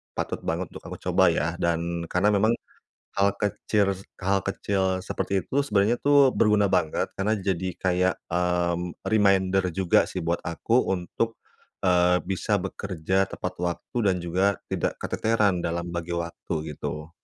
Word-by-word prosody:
patut - - -3
banget 85 +2 -2
untuk - - -10
aku - - -7
coba 95 +2 +4
ya. 85 -2 +2
Dan, 85 0 -1
karena 95 +5 +2
memang, 110 +3 +3 0.6
hal 100 0 +3
kecir 105 0 0 0.4
hal 95 +1 +2
kecil 100 0 -1 0.2
seperti 95 0 -1
itu, - - -8
sebenarnya 105 +2 +2
tuh, 140 -2 +6
berguna 105 -2 +4
banget, 80 -5 0
karena 105 +2 0
jadi 95 -2 -1
kayak, 90 0 +2
mmm, 90 0 -1
reminder 95 -3 +3
juga 95 0 +3
sih - - -4
buat 85 +1 0
aku 90 +6 -2 0.2
untuk, 105 +5 -2 0.5
eee, 90 -1 +4
bisa 100 +2 0
bekerja 95 0 -1
tepat 90 0 -4
waktu 85 +6 -4
dan 95 -2 +3
juga, 95 +3 +1
tidak - - -1
keteteran 105 -4 +1
dalam 85 +1 -2
bagi 85 0 -4
waktu 85 0 -4 0.2
gitu. 75 +3 -5
95 Hz, 145 wpm, -26 LUFS, 85-100 Hz, 0.6 s, tuh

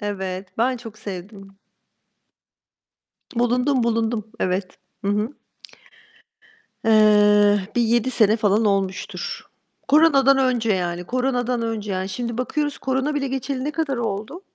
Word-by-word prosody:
Evet, 190 -2 -5
ben 250 +2 +2
çok 225 -2 -11
sevdim. 195 0 -9 1.8
Bulundum, 250 +2 +1
bulundum. 225 -1 -1
Evet. 185 0 -2 0.3
Hı - - 0
hı. 215 +7 -1 1.5
Eee, 210 -1 +5 0.2
bir 240 - +4
7 235 +2 +2
sene 220 -2 +3
falan 215 0 +2
olmuştur. 195 -2 -2 0.5
Koronadan 275 -3 +5
önce, 245 -4 +1
yani. 180 -1 -2
Koronadan 250 0 -1
önce, 215 -3 -3
yani. 185 +1 -2
Şimdi 235 +3 -4
bakıyoruz 290 +3 -2
korona 265 +3 -1
bile 275 -1 -1
geçeli 265 0 -3
ne 300 - -2
kadar 300 -5 -1
oldu? 230 - -4
225 Hz, 120 wpm, -22 LUFS, 205-255 Hz, 1.8 s, Eee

